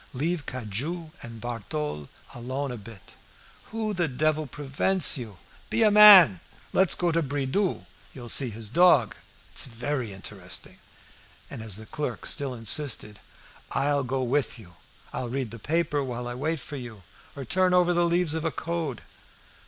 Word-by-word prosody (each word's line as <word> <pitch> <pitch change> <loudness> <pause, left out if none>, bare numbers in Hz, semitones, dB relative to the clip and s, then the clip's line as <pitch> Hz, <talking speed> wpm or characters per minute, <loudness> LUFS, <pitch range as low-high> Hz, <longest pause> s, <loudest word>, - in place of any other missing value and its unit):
"Leave 155 +3 -2
Cujas 130 - -4
and 115 -1 -8
Barthole 75 -11 -4 0.2
alone 130 +3 -4
a 125 - -5
bit. 105 -1 -13 0.5
Who 220 -1 -3
the 175 -3 0
devil 155 +2 0
prevents 145 +7 +1
you? 110 -7 -7 0.3
Be 230 - +2
a 215 - +5
man! 195 - +9 0.3
Let's 190 -1 +4
go 175 -1 0
to 165 +1 +1
Bridoux'. 145 +6 -1 0.3
You'll 120 -3 -10
see 130 +2 +4
his 110 0 -4
dog. 150 - +5 0.4
It's - - 0
very 125 -1 -3
interesting." 95 -2 -7 0.7
And - - -7
as 110 -4 -4
the 110 +2 -9
clerk 150 +6 -5
still 140 -4 0
insisted 115 -3 -1 0.5
"I'll 140 +1 +1
go 130 +1 -2
with 130 0 0
you. 95 -6 -14 0.4
I'll 125 - -3
read 125 -2 -3
a 115 - -8
paper 150 +2 0
while 125 -2 -5
I 120 - -4
wait 155 +6 -2
for 145 +2 -8
you, 115 -6 -9 0.3
or 140 -2 -6
turn 185 +7 +2
over 180 -1 +4
the 175 0 +2
leaves 170 -2 +1
of 160 -1 -2
a 165 - +1
'Code. 165 -7 -4
135 Hz, 160 wpm, -26 LUFS, 115-165 Hz, 0.7 s, man